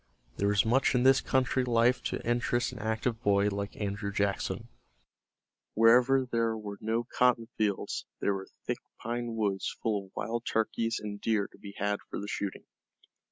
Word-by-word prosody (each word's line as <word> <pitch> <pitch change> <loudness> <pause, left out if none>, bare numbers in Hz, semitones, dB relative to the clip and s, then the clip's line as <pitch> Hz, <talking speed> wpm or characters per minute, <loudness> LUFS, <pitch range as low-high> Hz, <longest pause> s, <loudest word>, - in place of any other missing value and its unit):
There 100 - +1
was 100 0 +3
much 130 +4 +3
in 125 - +3
this 135 +1 +6
country 130 0 +1
life 120 +1 +3
to - - -3
interest 120 +1 +1
an 125 - -9
active 110 +2 -1
boy 100 -1 +3
like 100 0 -4
Andrew 100 0 -2
Jackson. 100 -1 -1 1.1
Wherever 125 +4 +5
there 115 -2 0
were 105 -2 -7
no 115 +2 0
cotton 120 -1 +2
fields 105 -3 -1
there 100 - +1
were 95 0 -5 0.2
thick - - -2 0.2
pine 120 0 -3
woods 100 -3 -1
full 105 -3 0
of - - -26
wild 115 +3 -3
turkeys 115 +1 0
and 105 -1 -6
deer 110 -3 +1
to - - -17
be 100 -1 -10
had 100 0 0
for - - -4
the 100 - -5
shooting. 100 -2 -3
110 Hz, 170 wpm, -30 LUFS, 100-120 Hz, 1.1 s, this